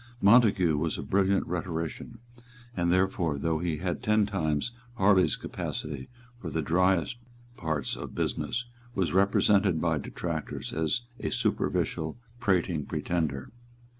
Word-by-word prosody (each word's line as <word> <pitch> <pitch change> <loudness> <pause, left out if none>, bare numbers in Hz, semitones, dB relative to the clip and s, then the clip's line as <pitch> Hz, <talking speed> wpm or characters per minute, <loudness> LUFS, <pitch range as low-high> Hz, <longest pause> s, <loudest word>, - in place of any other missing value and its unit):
Montague 100 -7 +5
was 80 0 -1
a - - -4
brilliant 95 0 +2
rhetorician, 85 +5 -4 0.6
and, 85 -1 +1
therefore, 90 -4 +1
though 80 +3 0
he 85 -2 -1
had 90 +2 -2
ten 105 -2 +3
times 80 -2 -1 0.2
Harley's 95 -3 +4
capacity 70 -4 -5 0.3
for - - -5
the 80 - -1
driest 90 +5 +2 0.4
parts 80 - -2
of - - -7
business, 125 +1 -1 0.3
was 95 -3 0
represented 100 -2 +4
by 80 -2 +1
detractors 80 +2 -4
as 80 +8 0 0.2
a - - -2
superficial, 80 +4 0 0.2
prating 90 -8 +1
pretender. 80 -6 -2
85 Hz, 125 wpm, -28 LUFS, 80-95 Hz, 0.6 s, Montague